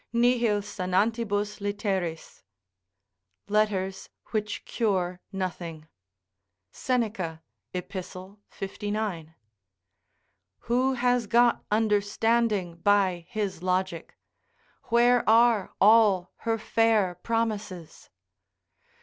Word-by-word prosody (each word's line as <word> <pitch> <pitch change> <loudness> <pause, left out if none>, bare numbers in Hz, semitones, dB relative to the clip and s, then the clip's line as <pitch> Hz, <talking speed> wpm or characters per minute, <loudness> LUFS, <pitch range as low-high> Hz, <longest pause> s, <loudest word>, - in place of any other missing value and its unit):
"Nihil 235 -3 +2
sanantibus 205 +2 -1
litteris." 195 -5 -3 1.1
["Letters 200 -2 0 0.2
which 210 -2 -3
cure 185 -5 -1
nothing." 175 -4 -5 0.8
Seneca, 210 -10 -2 0.3
Ep., 180 -1 -6
59.] 195 -1 -6 1.3
Who 255 +3 +1
has 245 -2 +1
got 240 +2 +3
understanding 210 -2 +1
by 185 -2 +2
his 210 -6 -3
logic? 185 -2 -2 0.7
Where 240 +1 +4
are 230 -2 +4
all 205 -4 +5
her 225 -1 -1
fair 220 -4 +2
promises? 215 -7 -3
205 Hz, 75 wpm, -27 LUFS, 185-225 Hz, 1.3 s, all